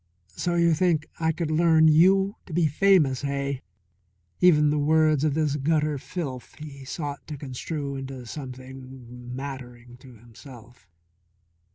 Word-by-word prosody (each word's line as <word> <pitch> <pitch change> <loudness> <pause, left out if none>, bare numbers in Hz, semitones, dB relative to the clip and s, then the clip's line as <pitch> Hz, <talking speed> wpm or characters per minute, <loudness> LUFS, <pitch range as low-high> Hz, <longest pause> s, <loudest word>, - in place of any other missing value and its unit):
"So 175 -1 -1
you 170 -1 +4
think 160 -2 +1
I 160 0 +2
could 160 -1 -3
learn 160 0 +4
you 190 +6 +4
to 170 - -9
be 170 0 +2
famous, 155 -4 +3
hey?" 140 -1 -2 0.8
Even 150 -4 +5
the 150 - 0
words 155 -1 +3
of 150 -2 +1
this 150 -2 0
gutter 150 0 0
filth 135 -6 -6
he 145 -3 -10
sought 145 0 -6
to 150 -1 -6
construe 140 +1 -5
into 135 -2 -7
something 130 -2 -9
nattering 125 -3 -8
to 125 -1 -15
himself. 120 -1 -15
145 Hz, 140 wpm, -25 LUFS, 130-160 Hz, 0.8 s, Even